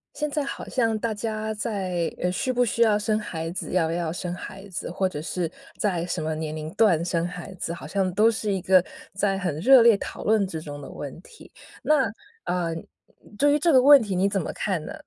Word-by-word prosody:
现 300 -1 -2
在 295 0 -1
好 275 - -6
像 225 -4 +1
大 225 +1 -2
家 220 0 -3
在 190 -6 -2
呃， 180 - 0
需 255 +7 -1
不 245 0 +2
需 230 - -1
要 220 -3 +5
生 215 +1 0
孩 165 -6 -5
子， 185 - -5
要 180 -3 +2
不 - - -2
要 - - -1
不 - - -2
要 - - -2
生 175 +1 -4
孩 195 +2 -9
子， 185 - -5
或 190 +2 0
者 150 -5 -5
是 170 +1 -2 0.3
在 185 -7 0
什 175 -1 -3
么 160 0 -1
年 155 0 -4
龄 155 0 -5
段 195 -6 +3
生 170 -2 0
孩 180 +2 -8
子， 170 -2 -4
好 170 - -9
像 190 -2 0
都 215 +4 +5
是 215 -2 -2
一 195 - 0
个 185 0 +5 0.3
在 195 0 0
很 180 -6 -2
热 255 +7 +7
烈 230 -1 +7
讨 - - -7
论 215 -2 +3
之 165 -4 -5
中 145 -2 -8
的 135 - -9
问 145 +2 -7
题。 445 - -16 0.3
那， 280 -6 +3 0.4
呃， 175 -2 -1 0.6
对 290 +3 +4
于 295 - +2
这 335 +2 +3
个 260 -3 +6
问 280 +1 +8
题 205 -4 -3
你 185 +2 +2
怎 200 -1 0
么 - - -4
看 185 -6 -2
呢？ - - -7
195 Hz, 260 characters per minute, -25 LUFS, 170-225 Hz, 0.6 s, 问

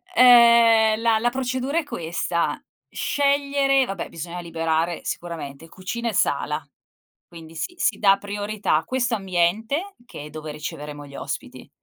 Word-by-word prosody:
Ehm, 235 -2 +6
la 225 -2 +3
la 240 +1 +2
procedura 260 +3 -2
è - - -3
questa: 170 - -2 0.3
scegliere 280 -1 +2
vabbè 195 -5 -5
bisogna 170 +2 -7
liberare 165 0 -1
sicuramente 165 -3 -6
cucina 235 +5 -4
e - - -4
sala, 150 -1 0 0.6
quindi 165 -1 -13
si 355 - -4
si - - +1
dà 195 -1 +5
priorità 205 -5 -1
questo 245 -2 0
ambiente 215 - -1
che 150 - -9
è - - -9
dove 155 0 -7
riceveremo 150 -1 -7
gli 140 - -13
ospiti. - - -7
200 Hz, 135 wpm, -23 LUFS, 165-245 Hz, 0.6 s, Ehm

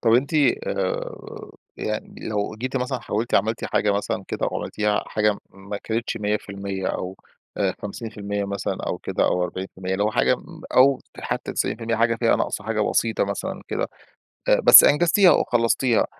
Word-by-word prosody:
طب 115 -1 +3
أنتِ 140 +6 +1 0.3
آآ 95 -1 -2 0.7
يعني 110 +1 -5
لو 105 0 -2
جيتِ 130 +2 -3
مثلًا 125 0 -1
حاولتِ 110 +2 -2
عملتِ 110 +3 +1
حاجة 105 - +1
مثلًا 105 0 -2
كده - - -2
وعملتيها 105 -1 -1
حاجة 105 -1 +1
ما 100 +1 -7
كانتش 115 +1 -2
100% 100 -2 -3
أو 95 +1 -3 0.4
أ 95 -2 +1
50% 105 -1 -4
مثلًا 100 -1 -3
أو - - -2
كده - - -1
أو 90 - +1
40% 95 +1 -5
اللي 100 +2 +1
هو 105 - +1
حاجة - - +3
مب - - -13
أو 135 +1 +5 0.2
حتّى - - -3
90% 115 0 -1
حاجة 115 0 +2
فيها 115 0 +3
ناقصة 105 - -2
حاجة 110 -1 -1
بسيطة 110 0 +1
مثلًا 100 0 -4
كده، - - -2 0.6
أ - - +5
بس - - +10
أنجزتيها 175 +5 +5
وخلّصتيها 120 +1 +2
105 Hz, 160 wpm, -23 LUFS, 100-115 Hz, 0.7 s, بس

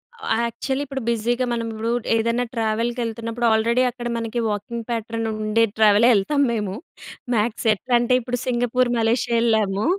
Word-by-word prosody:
అవ - - -8 0.2
యాక్చువలీ, 265 +4 -3
ఇప్పుడు 270 -1 -5
బిజీగా 240 +2 0
మనం 230 -1 -2
ఇప్పుడు, 220 +1 -3 0.3
ఏదన్నా 230 +2 0
ట్రావెల్‌కెళ్తున్నప్పుడు, 230 +1 -2
ఆల్రెడీ 235 +3 +2
అక్కడ 240 -1 -6
మనకి 230 +1 -3
వాకింగ్ 225 +3 -4
ప్యాటర్న్ 225 0 -3 0.2
ఉండే 230 +2 +3
ట్రావెలే 215 +2 +6
ఎళ్తాము 280 +8 +2
మేము. 210 -4 -2 0.6
మ్యాక్స్ 225 +2 -1
ఎట్లా 245 +4 -1
అంటే, 240 +1 +2
ఇప్పుడు 245 +1 -3
సింగపూర్, 245 0 +1
మలేషియా 235 +1 +1
ఎళ్ళాము. 215 -2 +1
230 Hz, 145 wpm, -22 LUFS, 220-245 Hz, 0.6 s, ట్రావెలే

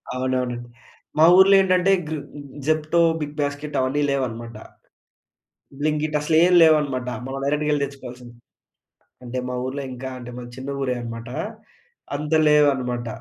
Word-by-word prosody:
అవునవును. 125 -1 -1 0.6
మా 155 - +7
ఊర్లో 195 +1 +7
ఏంటంటే 185 0 +2 0.2
గృ 155 - -3 0.5
జెప్టో, 155 +2 +1 0.2
బిగ్ 150 0 -5
బాస్కెట్ 145 +1 -4
అవన్నీ 130 +3 0
లేవన్నమాట. 120 -4 -3 1.2
బ్లింకిట్ 150 0 0
అస‌లేం 160 +4 +3
లేవన్నమాట. 145 -6 +2 0.2
మనం 135 +1 -5
డైరెక్టుగెళ్లి 150 0 0
తెచ్చుకోవాల్సింది. 125 -3 -11 0.9
అంటే 125 +1 -4
మా 125 - -3
ఊర్లో 140 +2 -4
ఇంకా 130 +1 -6
అంటే 125 -1 -9
మన 125 - -7
చిన్న 135 +2 -5
ఊరే 130 -2 -1
అన్నమాట, 115 0 -7 0.9
అంత 150 +2 -3
లేవన్నమాట. 130 -5 +2
140 Hz, 125 wpm, -22 LUFS, 125-150 Hz, 1.2 s, మా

